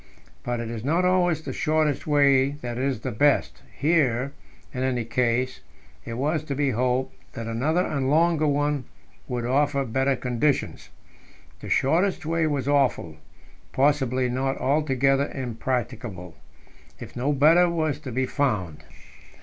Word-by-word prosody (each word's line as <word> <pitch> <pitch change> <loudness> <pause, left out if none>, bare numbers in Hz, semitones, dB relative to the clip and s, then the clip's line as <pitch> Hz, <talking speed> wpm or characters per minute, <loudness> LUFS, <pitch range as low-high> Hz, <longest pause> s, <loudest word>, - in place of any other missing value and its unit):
But 120 -1 -3
it 115 -1 -4
is 115 -2 -6
not 165 +7 +1
always 175 -3 +2
the - - -5
shortest 155 -2 0
way 140 -2 +4
that 120 0 -4
is 130 -4 -1
the - - -3
best; 145 +7 +1 0.2
here, 140 -5 +1 0.4
in 130 - -4
any 125 -3 -1
case, 125 +2 0 0.5
it 115 - -5
was 150 +5 -1
to 140 - -3
be 140 -1 +1
hoped 125 +2 -1 0.2
that 115 - -6
another 145 +11 0
and 135 -3 -1
longer 160 0 +3
one 145 -2 0 0.4
would 120 -2 -3
offer 140 +2 +1
better 130 +3 +1
conditions. 125 +3 -1 0.7
The - - -9
shortest 175 +5 +1
way 165 0 +1
was 140 -3 -2
awful 135 - +1 0.6
possibly 130 -2 +2
not 135 +2 -1
altogether 135 -1 +1
impracticable, 120 -7 -4 0.7
if - - -10
no 130 +4 0
better 160 +5 +5
was 155 -4 -1
to 130 - -7
be 130 +2 0
found. 105 - -2
135 Hz, 140 wpm, -25 LUFS, 125-150 Hz, 0.7 s, better